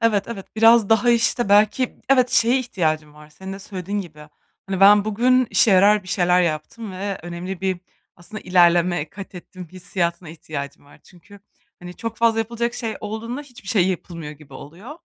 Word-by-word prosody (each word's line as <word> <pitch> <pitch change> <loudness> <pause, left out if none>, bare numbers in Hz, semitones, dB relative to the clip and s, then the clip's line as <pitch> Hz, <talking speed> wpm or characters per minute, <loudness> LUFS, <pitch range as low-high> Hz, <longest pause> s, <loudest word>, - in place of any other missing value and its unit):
Evet, 215 -3 +2
evet, 205 -5 -7
biraz 225 -1 +5
daha, 225 +2 +3
işte, 235 -1 +1
belki, 215 +5 +2
evet, 255 -2 +3
şeye 240 +3 +3
ihtiyacım 155 - -2
var, 150 0 -15
senin 190 +5 -9
de 195 - -7
söylediğin 200 0 -5
gibi. 150 -5 -12 0.4
Hani, 195 -1 -3
"Ben 200 +1 +7
bugün 250 +4 +2
işe 225 - +3
yarar 200 +2 +5
bir 185 - -14
şeyler 180 -1 +2
yaptım 175 +7 -4
ve 195 +1 -4
önemli 175 +2 -6
bir, 190 -2 -2 0.4
aslında, 210 +5 -10
ilerleme 175 -2 +2
katettim," 185 -2 -11
hissiyatına 175 -2 -3
ihtiyacım 150 -3 -8
var. 145 - -20
Çünkü 195 +3 -18 0.4
hani, 180 -1 -10
çok 230 -1 -6
fazla 230 -1 +2
yapılacak 235 +1 -2
şey 225 -3 -4
olduğunda 220 +5 -5
hiçbir 245 -8 -14
şey 190 -4 +2
yapılmıyor 170 -4 -5
gibi 150 -1 -16
oluyor. 175 - -11
195 Hz, 170 wpm, -21 LUFS, 175-225 Hz, 0.4 s, Ben